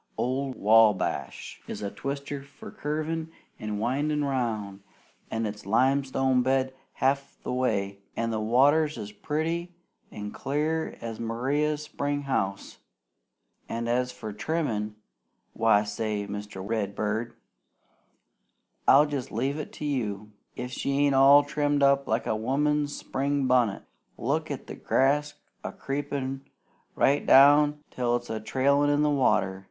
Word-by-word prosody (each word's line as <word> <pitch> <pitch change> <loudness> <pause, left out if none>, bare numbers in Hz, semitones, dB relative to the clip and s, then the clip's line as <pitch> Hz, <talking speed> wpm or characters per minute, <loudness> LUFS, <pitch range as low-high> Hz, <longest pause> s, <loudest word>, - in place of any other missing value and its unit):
"Old 130 +1 -1
Wabash 105 - +2
is - - -6
a 100 - -3
twister 140 0 -5
for 140 - -12
curvin' 155 +2 -3 0.3
and 105 -1 -4
windin' 145 +6 0
round, 110 -7 -2 0.5
an' 115 0 -2
it's 105 0 -5
limestone 130 +3 +2
bed 130 +1 +1 0.2
half 140 +1 0
the - - -3
way, 100 -6 -1 0.2
an' 115 0 -1
the 110 - -1
water's 145 +8 +3
as 105 0 -6
pretty 165 +8 -3 0.3
an' 105 0 -7
clear 155 +3 -2
as 115 -1 -6
in 115 - -3
Maria's 145 +6 0
springhouse. 140 -10 -2 0.9
An' 115 0 -3
as 125 +1 0
for 110 -3 -7
trimmin', 110 -5 -2 0.6
why 110 -2 +3
say, 105 0 -3
Mr. 105 -1 -6
Redbird, 110 +2 -2 1.5
I'll 145 +3 +7
jest 145 -4 -4
leave 135 +7 -1
it 150 - -6
to 150 - -6
you 105 -7 -2 0.2
if 125 0 -5
she 140 +2 -2
ain't 140 - +3
all 140 +2 +7
trimmed 145 0 0
up 140 0 +4
like 110 +1 0
a - - 0
woman's 145 +5 0
spring 140 +1 -1
bunnit. 125 -6 +2 0.3
Look - - -1
at - - -5
the - - -8
grass 145 +2 +1 0.3
a - - -4
creepin' 135 -1 -4 0.5
right 140 +2 +3
down 145 +2 +6
till 120 -1 0
it's 120 -1 -4
a 110 - -2
trailin' 140 +6 +2
in 145 +1 +3
the 150 - +3
water! 105 -8 +2
130 Hz, 135 wpm, -27 LUFS, 110-145 Hz, 1.5 s, I'll